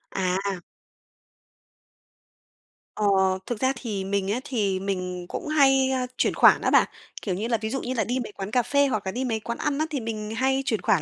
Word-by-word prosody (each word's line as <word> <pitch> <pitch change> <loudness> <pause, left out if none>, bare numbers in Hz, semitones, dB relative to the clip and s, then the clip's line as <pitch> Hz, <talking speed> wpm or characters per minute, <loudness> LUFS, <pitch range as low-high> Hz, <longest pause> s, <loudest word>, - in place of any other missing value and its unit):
À. 190 0 -1 2.3
Ờ, 210 - -1 0.4
thực 240 -3 -4
ra 260 +1 +3
thì 215 -6 -4
mình 195 0 -1
ấy 235 - 0
thì 205 -9 0
mình 180 -2 -3
cũng - - -5
hay, 270 -3 +4
ơ, 255 -1 0
chuyển - - +2
khoản - - +6
á - - +1
bạn, - - +5 0.3
kiểu 190 -4 -2
như 215 +5 -2
là, 235 - +1
ví 220 0 -4
dụ 270 +3 -2
như 255 - -3
là 235 - +1
đi 250 +2 -1
mấy 210 - -8
quán 195 0 -6
cà 245 0 +3
phê 280 +3 +3
hoặc 215 -5 -1
là 190 - -1
đi 255 +5 -3
mấy 225 -3 -1
quán 235 +2 -5
ăn 280 - -1
á, 310 - +2
thì 290 -4 -2
mình 220 -1 -4
hay 265 +2 +1
chuyển 220 -5 0
khoản 205 -7 +2
225 Hz, 220 wpm, -25 LUFS, 195-260 Hz, 2.3 s, khoản